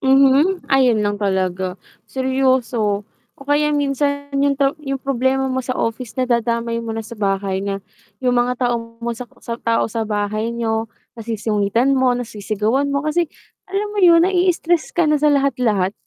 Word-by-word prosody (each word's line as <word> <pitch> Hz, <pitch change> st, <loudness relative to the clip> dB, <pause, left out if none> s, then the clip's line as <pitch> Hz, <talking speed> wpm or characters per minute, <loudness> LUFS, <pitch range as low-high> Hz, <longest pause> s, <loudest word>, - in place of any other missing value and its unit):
Mhm. 275 Hz, +7 st, +4 dB
Ayun 250 Hz, -5 st, +4 dB
lang 205 Hz, 0 st, -1 dB
talaga. 190 Hz, -2 st, -1 dB, 0.3 s
Seryoso. 260 Hz, -6 st, 0 dB, 0.3 s
O -, -, -13 dB
kaya 300 Hz, +1 st, +2 dB
minsan 285 Hz, 0 st, -1 dB
yung 280 Hz, 0 st, +3 dB
to 275 Hz, 0 st, +2 dB
yung 275 Hz, -2 st, -4 dB
problema 265 Hz, 0 st, 0 dB
mo 260 Hz, -, -1 dB
sa 255 Hz, -, -2 dB
office 230 Hz, 0 st, -3 dB
nadadamay 235 Hz, -2 st, 0 dB
mo 230 Hz, -1 st, -4 dB
na 225 Hz, -, -3 dB
sa 220 Hz, +1 st, -10 dB
bahay 195 Hz, -1 st, 0 dB
na, 195 Hz, 0 st, -3 dB, 0.4 s
yung 250 Hz, -1 st, +2 dB
mga 245 Hz, +1 st, +1 dB
tao 240 Hz, -1 st, +1 dB, 0.2 s
mo 235 Hz, -, -1 dB
sa 245 Hz, +2 st, -7 dB, 0.2 s
sa 235 Hz, -1 st, -5 dB
tao 230 Hz, -1 st, +1 dB
sa 225 Hz, 0 st, -2 dB
bahay 215 Hz, +2 st, -1 dB
niyo 225 Hz, -1 st, -1 dB, 0.3 s
nasusungitan 220 Hz, +2 st, 0 dB
mo, 260 Hz, -2 st, +3 dB
nasisigawan 220 Hz, +3 st, -1 dB
mo 280 Hz, +1 st, -1 dB
kasi 315 Hz, +2 st, +1 dB, 0.4 s
alam 400 Hz, +2 st, -2 dB
mo 420 Hz, -, -4 dB
yun 340 Hz, -2 st, +7 dB
naii-stress 350 Hz, -2 st, +1 dB
ka 345 Hz, -, +4 dB
na 300 Hz, -1 st, +2 dB
sa 300 Hz, -, +4 dB
lahat-lahat. 250 Hz, -9 st, +1 dB
250 Hz, 165 wpm, -20 LUFS, 220-280 Hz, 0.4 s, yun